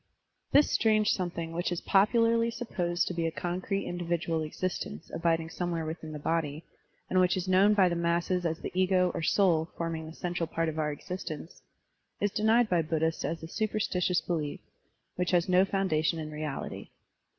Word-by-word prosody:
This 290 +1 +5
strange 215 -2 +3
something 170 -3 -2
which 175 +2 -2
is 175 - -1
popularly 230 +3 +3
supposed 180 -7 -1
to - - -2
be 165 -1 0
a - - -2
concrete 180 +4 -2
individual 170 -2 -1
existence 155 - -4
abiding 165 -1 0
somewhere 170 -3 -2
within 160 0 -6
the 155 - -5
body, 155 0 -1 0.4
and 185 - +2
which 180 0 +3
is 185 0 -3
known 195 +3 +5
by 190 -3 +5
the 170 - 0
masses 170 +2 0
as 165 -1 -1
the - - -6
ego 185 0 +3
or - - -3
soul 165 -1 +3
forming 165 -1 -3
the 160 - -10
central 175 -2 -2
part 165 0 -1
of 160 0 -4
our 150 -1 0
existence, 160 +1 -7 0.6
is 205 - +1
denied 220 +3 +3
by 175 -4 +2
Buddhists 160 0 -1
as 165 +2 -3
a - - -5
superstitious 190 -3 0
belief, 155 -4 -3 0.6
which 180 -1 0
has 175 -1 +2
no 185 +1 +5
foundation 175 -5 +1
in 155 -1 -5
reality. 150 -2 -5
175 Hz, 175 wpm, -29 LUFS, 160-185 Hz, 0.6 s, This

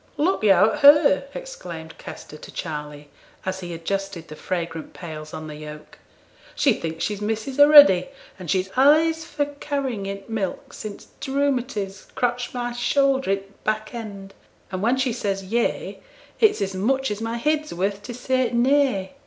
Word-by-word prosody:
'Look 355 +6 +1
yo' 200 +1 +5
at 300 - -4
her!' 285 -1 +6
exclaimed 170 - -8
Kester - - -9
to 150 - -11
Charley, 150 -2 -6 0.4
as 185 0 -2
he 175 -2 -7
adjusted 175 +1 -4
the 155 - -8
fragrant 165 -1 -4
pails 155 -3 -8
on 155 - -7
the 150 -1 -8
yoke. 150 0 -10 0.6
'She 275 - +4
thinks 165 -4 -4
she's 210 -1 -3
missus 220 +6 -3
a 290 - +9
ready, 285 -13 +8 0.3
and 180 -3 -8
she's 190 +2 0
allays 315 +4 +4
for 295 -3 -1
carrying 280 -7 -3
in 195 0 -5
t' - - -21
milk 215 -4 -4
since 210 -2 -8
t' 275 - -6
rhumatiz 250 -8 -1
cotched 245 0 -1
my 245 -1 -2
shouther 270 +1 +1
i' 195 - +4
t' 195 0 -10 0.2
back 215 +1 -2
end; 200 -4 -7 0.4
and 185 -1 -3
when 235 +5 +2
she 260 -2 0
says 195 -2 -2
"Yea," 230 +5 -1 0.4
it's 425 - +4
as 195 0 -3
much 265 +7 0
as 210 +1 -4
my 230 +1 -2
heed's 305 +4 0
worth 195 +3 -2
to 240 +4 -7
say 255 0 0
"Nay."' 245 -6 +2
215 Hz, 175 wpm, -23 LUFS, 185-270 Hz, 0.6 s, a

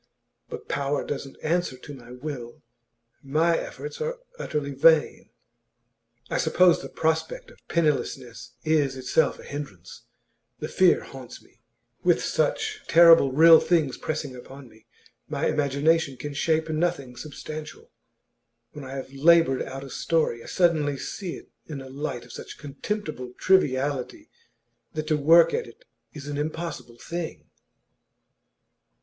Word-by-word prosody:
But - - -8
power 140 0 -1
doesn't 135 -1 -6
answer 170 -4 0
to 145 +3 -10
the 125 -2 -11
will. 125 -3 -7 0.6
My 160 +5 +2
efforts 450 - -6
are 480 +2 -2 0.2
utterly 145 -2 -3
vain; 155 +3 +3 1.0
I - - -1
suppose 180 -1 +4
the - - -8
prospect 160 0 -2
of - - -19
pennilessness 135 -7 -1
is 150 -4 +1
itself 130 +5 +1
a - - -13
hindrance; 105 - -8 0.5
the - - -5
fear - - +3
haunts - - -10
me. - - -27 0.4
With - - +4
such - - -1
terrible 165 -5 +7
real 160 +3 +8
things 160 -7 +1
pressing 150 -4 -4
upon 135 +2 -11
me, 110 -1 -22 0.4
my - - -2
imagination 145 0 +1
can 145 +3 -6
shape 160 +2 +1
nothing 155 -5 -1
substantial. 155 +3 -8 0.8
When 145 - -9
I 135 +1 -7
have 135 0 -7
laboured 155 -1 +4
out 135 +1 -6
a 135 - -10
story, 155 -8 0
I - - -12
suddenly 155 -6 +2
see 180 +5 -5
it - - -14 0.2
in 150 -3 -6
a 135 0 -10
light 130 -3 -5
of 120 - -13
such - - -9
contemptible 145 -3 -5
triviality 140 -7 +1 0.6
that 155 0 -2
to 155 - +3
work 165 +4 +6
at 465 +1 -1
it - - -17 0.3
is 145 -2 -9
an 145 0 -3
impossible 155 -5 -5
thing. 170 +4 -6
145 Hz, 140 wpm, -25 LUFS, 135-165 Hz, 1.0 s, real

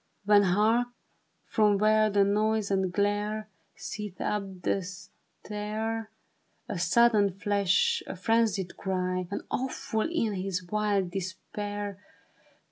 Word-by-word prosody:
When, 205 0 +6
hark! 215 +6 +3 0.6
from 210 -2 +3
where 215 +1 +4
the 200 -1 +4
noise 210 +1 +1
and 190 -2 +1
glare 205 +2 0 0.3
Seethe 210 -3 -6
up 195 -3 -3
the 195 - +1
stair, 210 +4 -6 0.6
A 185 - -3
sudden 205 +1 +4
flash, 205 - +2
a - - -5
frenzied 200 -2 +1
cry! 185 -1 -1
And 200 - -4
awful 250 -2 -1
in 230 -11 0
his 185 -1 -2
wild 200 -1 0
despair. 200 +2 -5
205 Hz, 115 wpm, -28 LUFS, 190-215 Hz, 0.6 s, When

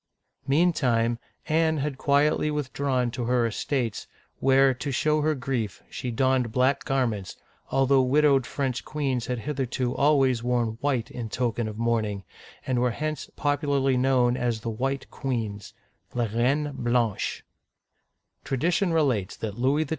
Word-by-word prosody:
Meantime, 130 -7 +2 0.3
Anne 160 0 +2
had 145 0 -2
quietly 150 +2 +2
withdrawn 135 -4 -1
to 120 0 -3
her 120 0 +2
estates, 115 0 -2 0.3
where, 135 0 +4
to 130 +3 -5
show 150 +4 +1
her 155 +1 +1
grief, 125 -5 -3
she 125 - -4
donned 130 0 +1
black 130 +4 +2
garments, 115 -8 -1 0.3
although 135 0 +3
widowed 135 -1 +3
French 130 -3 -2
queens 135 -5 -2
had 125 - -1
hitherto 130 -1 -2
always 135 -4 +3
worn 120 -2 -1
white 135 -5 0
in 115 -2 -5
token 120 -1 -1
of 105 -1 -6
mourning, 110 -4 0 0.4
and 130 -2 0
were 125 0 +2
hence 155 +5 -4
popu 145 +1 0
larly 135 -2 +2
known 125 -1 +3
as 120 -3 -1
the 115 - -3
White 135 +4 -2
Queens 110 -7 -4 0.4
{les 120 -2 0
Reines 135 +6 +1
Blanches), 120 -4 0 1.0
Tradition 170 +7 +1
relates 130 - +1
that 105 -3 -4
Louis 140 +5 +2
XII. 145 - -10
130 Hz, 145 wpm, -26 LUFS, 120-140 Hz, 1.0 s, where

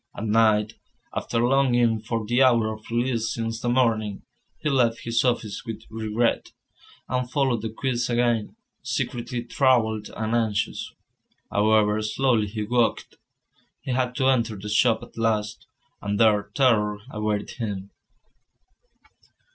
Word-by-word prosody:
At 105 - -4
night, 110 0 +3 0.4
after 115 - -2
longing 120 -3 +3
for 115 0 -3
the 120 +4 +2
hour 115 -4 +4
of 110 0 -12
release 115 -1 0
since 115 0 -3
the 120 - -1
morning, 110 -5 +1 0.3
he 155 - -4
left 120 -5 +2
his 115 0 +1
office 120 -3 -1
with 115 -2 -7
regret, 110 +1 -1 0.5
and 125 0 -2
followed 130 -5 +1
the 110 - -3
quays 120 +1 -2
again, 120 -2 0 0.3
secretly 120 0 -3
troubled 115 -4 +1
and 110 +1 -2
anxious. 110 -2 -1 0.6
However 105 0 +3
slowly 110 0 +1
he 105 +1 -4
walked, 120 +2 0 0.6
he 130 - -4
had 125 0 0
to 130 - 0
enter 115 -4 +2
the 100 +1 -7
shop 110 +1 +3
at - - -12
last, 110 -2 -1 0.3
and 100 0 -2
there 105 -2 +3
terror 105 -6 +3
awaited 105 -1 -2
him. 100 -5 -4
115 Hz, 135 wpm, -24 LUFS, 110-120 Hz, 0.6 s, hour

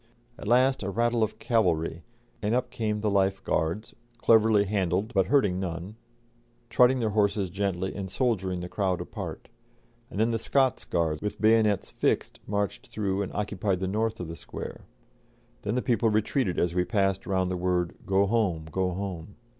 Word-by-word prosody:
At - - -9
last 130 +3 +4
a 100 - -2
rattle 120 +3 +1
of 110 0 0
cavalry, 85 -9 +1 0.4
and 105 +3 +1
up 125 0 -1
came 110 -3 -2
the 105 - +1
Life 95 -1 +1
Guards, 85 +7 -1 0.2
cleverly 110 -3 +5
handled 100 +2 0
but 95 -3 +3
hurting 105 -10 +3
none, 90 +2 -5 0.8
trotting 125 +3 +5
their 115 -4 0
horses 100 -3 +1
gently 95 -1 -2
and 95 -2 -5
shouldering 95 -6 0
the 90 - -4
crowd 95 -1 -1
apart; - - -6 0.6
and 100 - -6
then 115 +2 +3
the 115 - 0
Scots 130 +2 +1
Guards 80 -3 0
with 105 - -4
bayonets 110 -2 +3
fixed - - 0
marched 100 -1 -2
through 100 -2 -1
and 100 - -3
occupied 100 -2 -1
the 95 - -2
north 110 +3 -1
of 90 - -4
the 80 - -6
Square. - - -8 0.8
Then 105 +3 -2
the 125 - 0
people 115 -2 +2
retreated 110 -1 0
as 85 -1 +1
we 90 0 +2
passed 95 -1 0
round 95 -2 0
the - - -1
word, 90 -1 0
"Go 95 +1 +3
home, 100 -7 0
go 95 +2 0
home." 95 -1 -5
100 Hz, 175 wpm, -27 LUFS, 90-110 Hz, 0.8 s, cleverly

